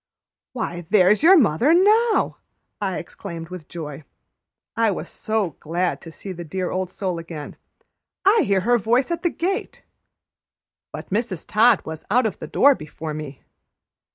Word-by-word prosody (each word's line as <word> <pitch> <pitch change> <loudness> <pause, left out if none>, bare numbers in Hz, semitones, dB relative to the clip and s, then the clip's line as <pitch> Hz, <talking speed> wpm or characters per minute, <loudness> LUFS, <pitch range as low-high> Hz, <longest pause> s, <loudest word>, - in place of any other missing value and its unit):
"Why, 175 -8 -4
there's 200 +1 +4
your 365 +5 +8
mother 250 - +4
now!" 430 +5 +3 0.4
I 190 -3 -1
exclaimed 170 -2 -8
with 180 -4 -9
joy, 150 -3 -7 0.7
I 225 -1 +3
was 195 - -3
so 215 -5 -2
glad 175 +3 -2
to 165 - -10
see 190 +4 -9
the 175 -1 -7
dear 180 +2 -3
old 185 -1 -2
soul 185 -2 -3
again. 165 -3 -8 0.7
"I 415 +4 +5
hear 195 -2 +2
her 240 +4 +3
voice 240 - +1
at 340 - -2
the 345 - +1
gate." 385 +6 -3 1.1
But - - -9
Mrs. 205 -5 -2
Todd 225 0 +4
was 160 0 -7
out 245 +4 +3
of 220 - -2
the - - -6
door 285 +1 +5
before 155 - -7
me. 150 -3 -8
190 Hz, 155 wpm, -22 LUFS, 170-245 Hz, 1.1 s, your